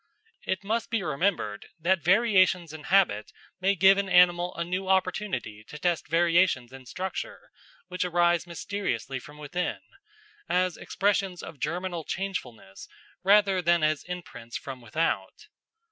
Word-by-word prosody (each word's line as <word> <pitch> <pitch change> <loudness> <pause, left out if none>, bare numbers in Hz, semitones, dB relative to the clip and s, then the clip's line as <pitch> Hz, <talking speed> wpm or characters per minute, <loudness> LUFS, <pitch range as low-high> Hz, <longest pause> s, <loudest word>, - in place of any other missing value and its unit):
It 190 +1 -1
must 225 +3 -1
be 225 -4 -1
remembered 150 - -1
that 175 +2 +2
variations 185 -4 +3
in 155 -2 -9
habit 175 - +2 0.3
may 195 +2 +2
give 195 +2 +6
an 200 -1 -2
animal 175 0 +4
a 170 - -2
new 185 +2 -3
opportunity 185 - -1
to 150 - -9
test 175 +1 -1
variations 165 -6 +2
in 130 -1 -12
structure 185 +6 -6 0.4
which 180 0 -2
arise 175 -1 +2
mysteriously 165 - -3
from 145 +4 -13
within, 150 +5 -3 0.7
as 180 -1 +1
expressions 195 -2 -1
of 145 - -9
germinal 175 -1 -3
changefulness 130 - -5 0.3
rather 200 -1 +4
than 170 -1 +3
as 155 -1 +1
imprints 175 -10 -7
from 130 -2 -8
without. 155 +9 -2
175 Hz, 135 wpm, -27 LUFS, 155-190 Hz, 0.7 s, give